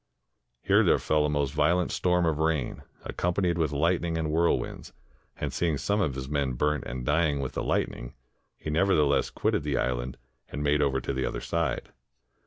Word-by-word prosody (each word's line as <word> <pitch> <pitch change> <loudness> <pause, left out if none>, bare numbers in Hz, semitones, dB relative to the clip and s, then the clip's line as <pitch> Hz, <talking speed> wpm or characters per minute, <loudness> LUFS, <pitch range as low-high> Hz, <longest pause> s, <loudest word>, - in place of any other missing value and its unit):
Here - - +4
there - - +4
fell 75 -1 +1
a - - -2
most 75 -2 0
violent 85 +4 +2
storm 90 -1 +2
of 80 -2 0
rain, 80 -5 0 0.2
accompanied 90 -1 -1
with 80 -3 +1
lightning 85 +3 +1
and 80 -1 -1
whirlwinds, 85 +2 0 0.4
and - - -3
seeing 80 -4 0
some 100 +8 0
of 75 -9 0
his 65 -1 -5
men 70 -2 -1
burnt 75 +4 0
and 60 0 -5
dying 75 -1 +2
with 65 -2 -3
the - - -2
lightning, - - -2 0.4
he 75 - -5
nevertheless 75 -4 +3
quitted - - 0
the - - -1
island 65 0 -2 0.3
and 75 - -4
made 75 0 +2
over 70 -2 +2
to 70 - -3
the 65 -1 -1
other - - -3
side. 85 -2 -2
75 Hz, 185 wpm, -27 LUFS, 70-85 Hz, 0.4 s, Here